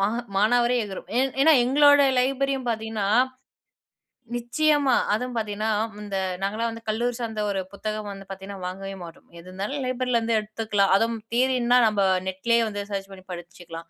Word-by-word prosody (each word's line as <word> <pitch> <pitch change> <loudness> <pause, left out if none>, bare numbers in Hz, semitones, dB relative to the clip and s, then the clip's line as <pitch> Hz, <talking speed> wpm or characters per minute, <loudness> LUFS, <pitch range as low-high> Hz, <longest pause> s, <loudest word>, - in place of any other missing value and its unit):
மா 195 - +3 0.3
மானாவாரியா 240 +3 +3
எகுரும். 195 -2 -8
ஏ - - +4 0.2
ஏன்னா 315 +3 +6
எங்களோட 285 +3 +6 0.2
லைப்ரரியும் 270 0 0
பார்த்தீங்கன்னா 220 -3 -2 1.3
நிச்சயமா 280 +2 +2 0.2
அதுவும் 250 +3 -3
பார்த்தீங்கன்னா, 215 0 -2 0.3
இந்த 200 -2 -4 0.3
நாங்கலாம் 220 +4 -1
வந்து 230 0 -9
கல்லூரி 240 +3 0
சார்ந்த 220 -3 -3
ஒரு 195 -1 -1
புத்தகம் 215 0 -4
வந்து 195 0 -10
பார்த்தீங்கன்னா 195 0 -8
வாங்கவே 195 +1 -6
மாட்டோம். 165 - -13
எது 170 - -13
இருந்தாலும் 205 +10 -4
லைப்ரரில 250 -1 0
இருந்து 225 0 0
எடுத்துக்கலாம். 210 -2 0
அதுவும் 225 +1 0
தியரின்னா 250 -1 +3
நம்ம 210 -2 +1 0.2
Net 190 0 -4
லயே 235 0 +5
வந்து 205 -1 -4
சர்ச் 195 -1 -4
பண்ணி 190 -1 -12
படிச்சுக்கலாம். 170 -1 -9
220 Hz, 155 wpm, -25 LUFS, 195-245 Hz, 1.3 s, ஏன்னா